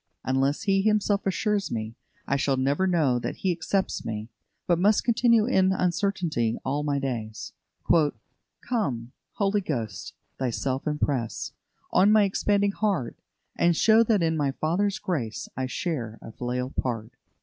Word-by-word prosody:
Unless 135 +6 +1
He 195 -2 +2
Himself 210 -1 +1
assures 200 +2 0
me, 110 -1 -4 0.3
I 140 - 0
shall 135 -1 +1
never 140 +8 +1
know 150 -9 +2
that - - -4
He 190 - 0
accepts 185 +3 -1
me, 110 0 -5 0.4
but 175 -1 +2
must 205 +3 +3
continue 230 -2 +4
in 190 -6 +3
uncertainty 175 - 0
all 140 +3 0
my 145 -1 0
days. 115 -6 -4 1.1
"Come, 135 - -1 0.2
Holy 200 0 +1
Ghost, 115 - -4 0.3
Thyself 130 +2 -2
impress 140 -6 -1 0.4
On 200 +3 +5
my 215 -1 +6
expanding 200 +1 +1
heart: 200 - -1 0.4
And 170 -1 +2
show 220 0 +6
that 210 -5 +2
in 160 -1 +1
the 140 -3 0
Father's 190 +6 +1
grace 130 - -3
I 130 0 -2
share 125 -5 -3
a - - -10
filial 125 +2 -3
part." 115 -4 -3
160 Hz, 145 wpm, -26 LUFS, 125-200 Hz, 1.1 s, my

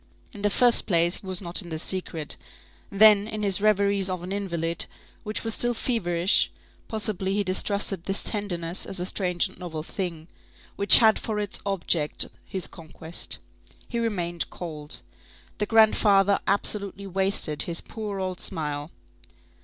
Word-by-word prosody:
In 205 - -9
the 205 - +2
first 240 +2 +4
place, 170 -1 +3
he 195 - -13
was 185 0 -3
not 175 +2 +1
in 175 - -11
the 160 - -4
secret; 165 -3 +2 0.5
then, 210 0 +5
in 215 -1 -5
his 200 -1 +2
reveries 200 -2 +2
of 185 -1 -4
an 180 - -7
invalid, 170 -4 -2 0.3
which 215 0 -5
were 225 - -1
still 240 +2 0
feverish, 180 -7 +2 0.4
possibly, 205 -4 -2
he 205 - +1
distrusted 195 -1 -1
this 195 0 +1
tenderness 180 -5 -2
as 195 - -2
a 180 - -2
strange 180 -2 +1
and - - -17
novel 160 -4 -6
thing, 170 -3 -5 0.5
which 200 -1 +9
had 220 -2 +5
for 215 -2 -4
its 205 -1 -4
object 170 -5 +1 0.2
his 190 -3 -2
conquest. 165 0 -4 0.5
He 235 - -2
remained 175 -7 -2
cold. 155 -3 -6 0.6
The 210 - -1
grandfather 205 -3 +4
absolutely 200 0 -1
wasted 190 -5 0
his 170 -1 +1
poor 210 -3 -6
old 185 -1 -4
smile. 150 -3 -3
195 Hz, 155 wpm, -25 LUFS, 170-205 Hz, 0.6 s, which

